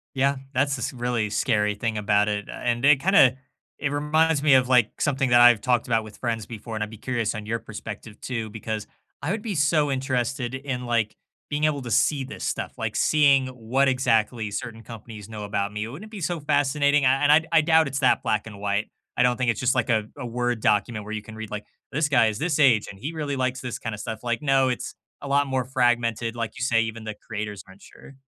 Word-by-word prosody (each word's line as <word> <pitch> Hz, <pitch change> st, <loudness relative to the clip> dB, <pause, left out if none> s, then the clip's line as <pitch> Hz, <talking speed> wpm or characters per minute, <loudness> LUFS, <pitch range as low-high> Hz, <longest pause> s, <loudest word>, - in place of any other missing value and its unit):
Yeah, 140 Hz, +1 st, +2 dB, 0.2 s
that's 135 Hz, +1 st, +1 dB
this 125 Hz, -1 st, -4 dB
really 120 Hz, -3 st, -1 dB
scary 105 Hz, -1 st, +1 dB
thing 110 Hz, +1 st, -2 dB
about 105 Hz, 0 st, +2 dB
it, 105 Hz, -1 st, -2 dB
uh, -, -, -6 dB
and 120 Hz, 0 st, -2 dB
it 145 Hz, -1 st, +6 dB
kinda 135 Hz, -7 st, +5 dB, 0.4 s
it 140 Hz, -, -1 dB
reminds 150 Hz, +1 st, +2 dB
me 145 Hz, -2 st, +5 dB
of, 130 Hz, -1 st, +4 dB
like, 125 Hz, -3 st, +3 dB
something 135 Hz, -3 st, +1 dB
that 120 Hz, 0 st, +6 dB
I've 120 Hz, -3 st, +7 dB
talked 125 Hz, -3 st, +1 dB
about 115 Hz, -2 st, +1 dB
with 105 Hz, -1 st, -12 dB
friends 115 Hz, -3 st, -3 dB
before, 115 Hz, 0 st, -8 dB
and 110 Hz, -1 st, -2 dB
I'd 105 Hz, -, -5 dB
be 110 Hz, -, -11 dB
curious 115 Hz, -1 st, -2 dB
on 110 Hz, -1 st, -6 dB
your 115 Hz, +2 st, -2 dB
perspective 110 Hz, -1 st, -9 dB
too 115 Hz, -4 st, -4 dB
because 110 Hz, 0 st, -5 dB, 0.3 s
I 145 Hz, -, -3 dB
would 210 Hz, +3 st, -2 dB
be 220 Hz, -, -3 dB
so 150 Hz, -2 st, +2 dB
interested 130 Hz, -1 st, -1 dB
in, 130 Hz, -2 st, -4 dB
like, 115 Hz, -3 st, 0 dB, 0.3 s
being 150 Hz, +1 st, 0 dB
able 145 Hz, -3 st, 0 dB
to 120 Hz, -, -6 dB
see 140 Hz, +5 st, +2 dB
this 135 Hz, -, -8 dB
stuff, -, -, -3 dB
like, -, -, -3 dB
seeing 140 Hz, -3 st, +4 dB
what 130 Hz, +2 st, 0 dB
exactly 115 Hz, -4 st, +1 dB
certain 115 Hz, +2 st, -6 dB
companies 110 Hz, -2 st, -10 dB
know 110 Hz, -1 st, -6 dB
about 100 Hz, -1 st, -2 dB
me, 105 Hz, +1 st, -4 dB
wouldn't 145 Hz, -, -9 dB
it -, -, -27 dB
be 210 Hz, -4 st, -7 dB
so 170 Hz, +1 st, -1 dB
fascinating, 145 Hz, -1 st, +2 dB
I 130 Hz, +1 st, +3 dB
and 145 Hz, -, +5 dB
I 155 Hz, +2 st, +7 dB
I -, -, +6 dB
doubt 160 Hz, 0 st, +4 dB
it's 135 Hz, 0 st, -3 dB
that -, -, +3 dB
black 110 Hz, 0 st, 0 dB
and 105 Hz, -2 st, -10 dB
white. 100 Hz, +1 st, -1 dB, 0.3 s
I -, -, +1 dB
don't 125 Hz, 0 st, +2 dB
think 125 Hz, -1 st, 0 dB
it's 110 Hz, -, -5 dB
just 130 Hz, +2 st, +1 dB
like 125 Hz, -, 0 dB
a 110 Hz, -2 st, +1 dB
a 140 Hz, -, -6 dB
Word 120 Hz, 0 st, -1 dB
document 105 Hz, +1 st, +1 dB
where 110 Hz, -, -6 dB
you 110 Hz, -, -3 dB
can 110 Hz, +1 st, -11 dB
read 110 Hz, -1 st, -7 dB
like, 105 Hz, 0 st, -5 dB, 0.3 s
"This 150 Hz, +2 st, 0 dB
guy 125 Hz, -5 st, +4 dB
is 110 Hz, 0 st, -2 dB
this 160 Hz, -1 st, 0 dB
age 120 Hz, -7 st, +4 dB
and 100 Hz, -, -14 dB
he 145 Hz, +9 st, -5 dB
really 150 Hz, -3 st, -3 dB
likes 130 Hz, 0 st, -1 dB
this 125 Hz, -2 st, -4 dB
kinda 115 Hz, -2 st, -5 dB
stuff." 110 Hz, +1 st, -5 dB
Like, 120 Hz, -1 st, -1 dB
no, 135 Hz, -2 st, +3 dB
it's 125 Hz, -, -4 dB, 0.3 s
a -, -, -7 dB
lot 140 Hz, +1 st, +3 dB
more 130 Hz, -2 st, -1 dB
fragmented, 120 Hz, -3 st, 0 dB
like 115 Hz, -2 st, -3 dB
you 130 Hz, -, -3 dB
say, 115 Hz, -4 st, +3 dB
even 110 Hz, 0 st, -4 dB
the 110 Hz, -1 st, -5 dB
creators 105 Hz, -2 st, -5 dB
aren't 95 Hz, +1 st, -16 dB
sure. 135 Hz, -, -15 dB
120 Hz, 240 wpm, -25 LUFS, 110-140 Hz, 0.4 s, I've